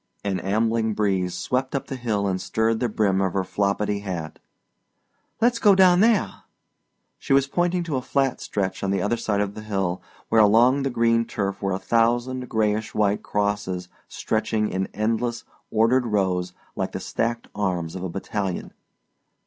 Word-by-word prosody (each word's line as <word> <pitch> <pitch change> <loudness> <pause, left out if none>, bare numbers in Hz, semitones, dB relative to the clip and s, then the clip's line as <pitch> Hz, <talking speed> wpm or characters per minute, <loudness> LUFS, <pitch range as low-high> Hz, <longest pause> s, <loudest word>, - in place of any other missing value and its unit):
An 100 -2 -1
ambling 110 +3 0
breeze 95 -4 0
swept 130 +2 -2
up 140 - -2
the 135 - -5
hill 110 -5 -1
and 95 -1 -1
stirred 110 0 0
the 120 - 0
brim 100 -3 +1
of 95 -2 0
her 95 - 0
floppidy 100 +1 -1
hat. 85 -6 -5 1.0
"Let's 235 0 +2
go 205 -4 +6
down 185 -2 +6
there!" 205 - +2 0.8
She - - -1
was 135 0 +5
pointing 175 +4 0
to 155 -5 -2
a - - -2
flat 135 0 0
stretch 95 -2 -2
on 100 - 0
the 100 0 +1
other 105 +5 +1
side 110 -3 -1
of 100 -1 -2
the 110 - -8
hill 95 -4 -2 0.3
where 110 - +5
along 120 +6 +5
the 135 - 0
green 115 -1 +2
turf 100 -3 -3
were 100 -1 0
a - - 0
thousand 120 +4 0
grayish 110 -1 0
white 105 -1 +1
crosses 100 -3 -2 0.2
stretching 110 -1 -1
in 95 +1 -2
endless, 115 +3 -1 0.3
ordered 115 +3 +2
rows 95 -4 0 0.2
like - - -3
the - - -3
stacked 115 +1 -2
arms 90 -5 -2
of 95 - -6
a 95 - -3
battalion. 95 +1 -4
105 Hz, 175 wpm, -24 LUFS, 95-120 Hz, 1.0 s, go